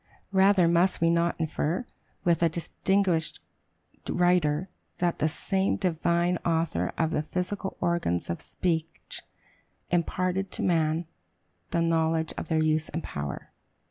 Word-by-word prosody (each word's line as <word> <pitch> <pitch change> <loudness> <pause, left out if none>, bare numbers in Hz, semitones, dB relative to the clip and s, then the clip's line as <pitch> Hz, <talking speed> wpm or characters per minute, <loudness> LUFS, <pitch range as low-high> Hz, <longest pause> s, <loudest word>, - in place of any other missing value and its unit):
Rather 190 -2 +5
must 175 +2 +3
we 165 0 +3
not 170 0 +1
infer, 160 +6 -1 0.4
with 170 -1 +2
a 170 - +4
distinguished 170 0 0 0.7
writer, 175 -2 +2 0.3
that 175 -1 0
"the 155 - +2
same 190 +4 0
Divine 175 -1 +1
Author 160 - 0
of 160 -1 +1
the - - +1
physical 180 +4 -3
organs 170 - 0
of 85 - -3
speech 165 -3 -3 0.7
imparted 185 +2 0
to - - -2
man 165 -1 +1 0.6
the 170 -1 +1
knowledge 160 -1 +1
of - - -5
their 160 -1 +2
use 155 0 +1
and 165 +2 -4
power"? 70 0 -5
170 Hz, 130 wpm, -27 LUFS, 160-180 Hz, 0.7 s, Rather